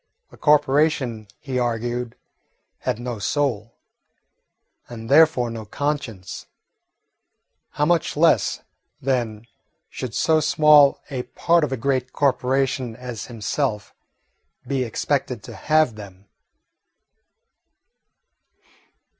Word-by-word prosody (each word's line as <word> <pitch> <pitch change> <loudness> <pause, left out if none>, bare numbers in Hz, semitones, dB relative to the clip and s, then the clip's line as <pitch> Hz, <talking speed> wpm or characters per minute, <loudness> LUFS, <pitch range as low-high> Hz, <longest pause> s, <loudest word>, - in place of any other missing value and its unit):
A - - -14
corporation, 145 -6 +2
he 130 -3 -3
argued, 120 0 -2 0.6
had - - -2
no 120 -2 -5
soul, 115 -3 -1 1.1
and 115 -1 -8
therefore 145 -6 +5
no 115 -1 -6
conscience. 115 -6 -4 1.3
How 145 - +1
much 165 -2 +1
less, 165 +2 +3 0.4
then, 120 -5 -2 0.5
should 125 -5 -6
so 160 -1 +3
small 150 -1 +5
a 130 -2 -2
part 165 +7 +1
of 150 - -1
a 130 - -1
great 130 +1 -1
corporation 130 -2 0
as 125 -2 -7
himself 110 0 -3 0.7
be 135 -2 -1
expected 115 - -2
to - - -10
have 155 -5 +2
them? 100 -2 -12
125 Hz, 95 wpm, -22 LUFS, 115-145 Hz, 1.3 s, therefore